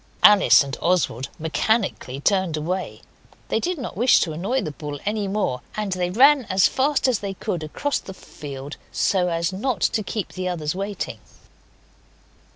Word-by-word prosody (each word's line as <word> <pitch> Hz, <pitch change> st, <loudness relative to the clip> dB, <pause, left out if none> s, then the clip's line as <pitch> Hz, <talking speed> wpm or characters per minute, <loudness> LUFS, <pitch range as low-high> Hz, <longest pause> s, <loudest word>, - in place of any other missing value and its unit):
Alice 205 Hz, -7 st, +7 dB
and 135 Hz, -2 st, -5 dB
Oswald 165 Hz, -8 st, 0 dB
mechanically 160 Hz, -, -1 dB
turned 185 Hz, -1 st, +1 dB
away; 180 Hz, +5 st, -3 dB, 0.5 s
they -, -, +1 dB
did 360 Hz, 0 st, -2 dB
not 255 Hz, -9 st, -6 dB
wish 240 Hz, +6 st, +5 dB
to 165 Hz, -, 0 dB
annoy 195 Hz, +12 st, -1 dB
the 155 Hz, -, -3 dB
bull 145 Hz, -1 st, -7 dB
any 210 Hz, -1 st, -1 dB
more, 195 Hz, -11 st, -1 dB, 0.2 s
and 210 Hz, -2 st, -2 dB
they 180 Hz, -1 st, -1 dB
ran 265 Hz, +6 st, +5 dB
as 190 Hz, -1 st, +4 dB
fast 275 Hz, +1 st, +1 dB
as 250 Hz, -5 st, +2 dB
they 195 Hz, -1 st, -5 dB
could 175 Hz, -2 st, -3 dB
across 215 Hz, -, -2 dB
the 190 Hz, -, -10 dB
field 140 Hz, -3 st, -9 dB
so 185 Hz, -2 st, +1 dB
as 170 Hz, +1 st, -1 dB
not 225 Hz, +2 st, -1 dB
to 215 Hz, -, +1 dB
keep 215 Hz, -1 st, -4 dB
the 185 Hz, 0 st, -3 dB
others 155 Hz, -4 st, -2 dB
waiting. 200 Hz, +2 st, -4 dB
185 Hz, 165 wpm, -23 LUFS, 160-215 Hz, 0.5 s, Alice